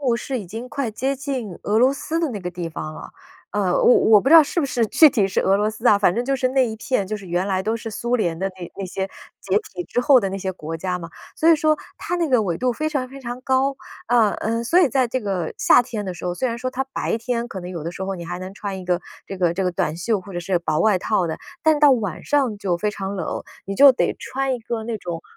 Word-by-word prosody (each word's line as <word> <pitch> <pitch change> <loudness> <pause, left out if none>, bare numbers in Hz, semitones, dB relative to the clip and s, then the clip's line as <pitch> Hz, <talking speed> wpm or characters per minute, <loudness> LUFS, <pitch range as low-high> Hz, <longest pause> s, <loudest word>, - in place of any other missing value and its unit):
路 250 -4 +1
是 255 +2 -3
已 205 - -7
经 225 +7 -7
快 270 -3 -2
接 265 +6 -1
近 260 - -4
俄 210 +2 +1
罗 255 +3 +5
斯 320 +4 -3
的 330 -2 0
那 210 -4 -5
个 180 -1 -4
地 175 -1 -5
方 155 -1 -6
了， - - -10 0.4
呃， 195 -3 +1
我 245 - +6
我 215 -2 +6
不 265 - 0
知 320 - +7
道 325 - +11
是 295 - -4
不 295 - +2
是 245 -3 0
具 315 - +7
体 210 -7 +1
是 190 - 0
俄 195 +1 +3
罗 210 +1 +1
斯 220 +3 -5
啊， 210 - +7
反 200 -3 +3
正 235 +5 -1
就 275 +2 0
是 255 -1 +1
那 260 -1 +2
一 220 - -5
片， 220 -2 -1
就 215 +2 -3
是 195 -2 -11
原 175 +2 0
来 190 -1 0
都 220 +3 -1
是 225 - -7
苏 235 +3 -1
联 170 -7 -1
的 190 +3 -1
那 175 -2 -7
那 195 - -3
些 190 +1 -4 0.3
解 - - 0 0.2
体 355 - -5
之 245 - -1
后 265 +1 +6
的 200 -5 -1
那 195 - -4
些 190 -1 -3
国 165 -3 -6
家 180 +1 -2
嘛， 170 - -8 0.3
所 325 - +3
以 330 - +8
说 310 -1 +2 0.2
它 355 - -3
那 335 -2 0
个 250 -5 +3
纬 175 -4 -2
度 250 -1 +1
非 310 +5 -2
常 275 -5 -2
非 275 +1 -11
常 245 0 -6
高， 270 0 +1 0.3
啊， 230 -3 +4
嗯， 230 +1 -1
所 340 +10 +4
以 330 - +4
在 260 -1 +2
这 255 +2 -2
个 190 -6 -3
夏 - - +5
天 220 -4 -5
的 185 - -4
时 175 - -9
候， 175 0 -1
虽 255 +8 -1
然 230 - -4
说 255 +1 -2
它 260 +1 -2
白 - - -1
天 235 0 -2
可 195 -5 -7
能 180 +1 -7
有 170 -4 -6
的 170 - -4
时 190 - -7
候 195 0 -3
你 170 - -7
还 175 +1 -5
能 185 +1 -7
穿 200 -2 -5
一 - - -9
个 180 0 0 0.2
这 195 - -7
个 170 -2 +2
这 195 - -1
个 180 - +1
短 155 -2 -1
袖 200 +3 0
或 195 +1 -11
者 175 - -3
是 180 +1 0
薄 155 -3 -1
外 210 -4 +3
套 185 -3 0
的， 160 - -4 0.2
但 315 -2 +4
到 290 -2 +7
晚 210 -9 -2
上 265 -8 +1
就 190 -4 0
非 210 +4 -1
常 195 -1 -5
冷， 180 -5 -4 0.2
你 195 0 -4
就 280 -1 +9
得 250 - 0
穿 270 0 -2
一 - - -4
个 225 -1 -4
那 230 0 -3
种， 170 -2 -6
220 Hz, 315 characters per minute, -22 LUFS, 185-255 Hz, 0.4 s, 道